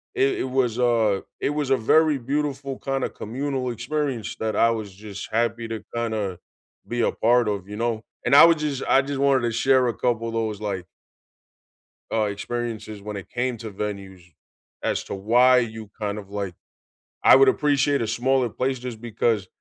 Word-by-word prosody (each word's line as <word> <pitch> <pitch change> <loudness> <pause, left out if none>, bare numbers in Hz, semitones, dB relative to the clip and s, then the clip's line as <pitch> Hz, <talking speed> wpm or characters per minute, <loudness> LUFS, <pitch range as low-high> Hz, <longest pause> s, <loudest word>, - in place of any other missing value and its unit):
it 395 0 +2
it - - 0
was 125 -3 +1
a 115 -5 +2 0.2
it - - 0
was 145 -2 -2
a 135 - +4
very 155 +5 +3
beautiful 140 +1 -2
kinda 135 -1 -2
communal 130 +2 -3
experience 125 0 -3
that 110 -1 -1
I 115 - +4
was 105 -4 -4
just 100 0 -8
happy 115 0 0
to 110 -2 -5
kinda 110 -6 -2 0.5
be 120 0 -1
a - - +2
part 120 0 +3
of, 100 -2 -2
you 105 - -7
know? 115 -1 -1 0.2
And 140 - +4
I 145 - +11
would 170 -1 +5
just 145 -3 -2
I 135 - +5
just 140 0 -4
wanted 140 -2 +3
to 120 - 0
share 130 +2 +3
a 120 - 0
couple 115 -2 0
of 115 - -5
those, 110 -2 -2
like 95 -4 -3 1.3
uh, 110 -1 +2
experiences 110 0 -4
when 105 0 -6
it 100 - -8
came 125 0 -1
to 110 0 -7
venues 100 -2 -6 0.6
as - - -1
to - - -7
why 120 +6 +4
you 110 -3 -5
kind 105 0 -2
of 100 -1 -9
like 100 -4 -4 0.7
I - - +8
would 135 - +7
appreciate 145 -1 +2
a 115 - 0
smaller 125 +2 +1
place 130 +4 -2
just 120 -3 -7
because 115 -3 0
115 Hz, 185 wpm, -24 LUFS, 105-135 Hz, 1.3 s, I